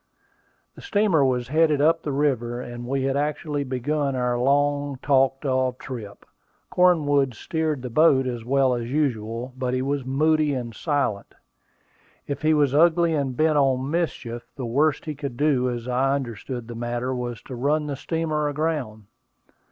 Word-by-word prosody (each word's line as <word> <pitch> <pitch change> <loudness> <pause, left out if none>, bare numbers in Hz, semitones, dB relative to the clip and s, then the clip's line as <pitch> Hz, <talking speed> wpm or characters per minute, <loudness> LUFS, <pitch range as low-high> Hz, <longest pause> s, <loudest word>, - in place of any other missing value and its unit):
The - - -13
steamer 205 - +2
was 125 -2 0
headed 155 -1 +3
up 165 +3 +3
the 150 - -3
river, 130 -4 0
and 120 -1 -7
we 135 +1 -1
had 135 0 0
actually 145 0 -1
begun 140 +2 -1
our 125 -1 0
long 145 +2 +1
talked 135 0 +2
of 130 -1 0
trip. 115 -8 -8 0.5
Cornwood 145 -8 +3
steered 155 0 -2
the 125 - -4
boat 135 -1 +4
as 120 -2 -4
well 135 +1 +2
as 120 -1 -3
usual, 125 -4 -2
but 130 -1 -2
he 130 - -1
was 140 0 -1
moody 150 +2 +2
and 120 -3 -5
silent. 140 -8 -2 0.9
If 140 -1 -4
he 155 0 +3
was 145 -3 +2
ugly 170 +2 +4
and 135 -4 -1
bent 155 -1 +3
on 135 0 +1
mischief, 120 -8 -3
the 130 - -5
worst 140 +5 +1
he 155 - -3
could 140 -4 -6
do, 135 -4 +2
as 120 -1 -5
I 130 +2 +1
understood 120 -2 -5
the 120 - -7
matter, 120 +2 -3
was 120 -2 -5
to - - -9
run 145 +5 0
the 145 -1 -3
steamer 155 0 -1
aground. 145 -8 -2
135 Hz, 165 wpm, -24 LUFS, 125-150 Hz, 0.9 s, boat